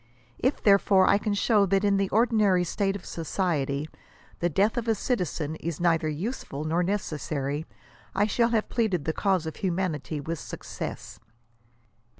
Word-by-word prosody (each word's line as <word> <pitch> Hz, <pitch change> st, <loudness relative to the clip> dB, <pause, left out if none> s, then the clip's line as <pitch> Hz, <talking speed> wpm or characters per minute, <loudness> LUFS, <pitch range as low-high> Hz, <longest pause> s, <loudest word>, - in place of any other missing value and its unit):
If 260 Hz, +3 st, 0 dB
therefore 200 Hz, -2 st, +5 dB
I 200 Hz, -, +4 dB
can 210 Hz, -1 st, -1 dB
show 205 Hz, -1 st, +3 dB
that 195 Hz, +1 st, +2 dB
in 200 Hz, -1 st, +3 dB
the 195 Hz, -1 st, 0 dB
ordinary 215 Hz, -5 st, +3 dB
state 195 Hz, +3 st, -1 dB
of 195 Hz, -, -8 dB
society, 155 Hz, -4 st, -1 dB, 0.5 s
the 175 Hz, -, +1 dB
death 200 Hz, +7 st, +2 dB
of 240 Hz, -2 st, -2 dB
a 225 Hz, -, +3 dB
citizen 175 Hz, -, -2 dB
is 165 Hz, -2 st, -4 dB
neither 165 Hz, -2 st, +2 dB
useful 155 Hz, -, -4 dB
nor 160 Hz, +3 st, +1 dB
necessary, 155 Hz, -6 st, -2 dB, 0.5 s
I 200 Hz, +2 st, +3 dB
shall 230 Hz, +2 st, +2 dB
have 225 Hz, -2 st, +1 dB
pleaded 205 Hz, -, 0 dB
the 160 Hz, -, 0 dB
cause 190 Hz, -4 st, +1 dB
of 160 Hz, -, -5 dB
humanity 170 Hz, -5 st, -2 dB
with 160 Hz, +3 st, -4 dB
success." -, -, -7 dB
185 Hz, 155 wpm, -27 LUFS, 160-205 Hz, 0.5 s, therefore